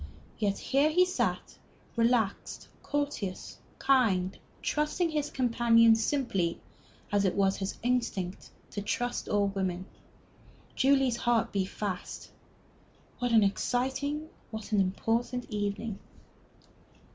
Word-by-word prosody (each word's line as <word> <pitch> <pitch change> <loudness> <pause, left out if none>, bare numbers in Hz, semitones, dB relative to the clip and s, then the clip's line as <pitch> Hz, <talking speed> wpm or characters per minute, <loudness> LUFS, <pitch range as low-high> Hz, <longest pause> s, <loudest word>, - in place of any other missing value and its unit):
Yet 200 -2 +1
here 280 +3 +2
he 360 +4 +4
sat, 365 - -2 0.4
relaxed, 230 -3 0
courteous, 285 -10 -3 0.2
kind, 200 -9 +2 0.3
trusting 305 +3 0
his 300 -1 -1
companions 230 -2 +4
simply, 195 - 0 0.5
as 205 -1 +3
it 190 - +1
was 195 -1 +2
his 195 0 -4
instinct 230 -7 -1 0.2
to 205 - -4
trust 245 +4 -2
all 205 -1 +2
women. 190 -2 -2 0.9
Julie's 265 -3 +3
heart 240 -3 +1
beat 195 -2 0
fast. 200 -3 -5 0.9
What 245 -1 0
an 225 -2 +6
exciting, 265 +8 -1 0.2
what 220 -1 -7
an 205 -2 +4
important 230 +6 -1
evening!... 205 0 -2
230 Hz, 110 wpm, -30 LUFS, 200-260 Hz, 0.9 s, an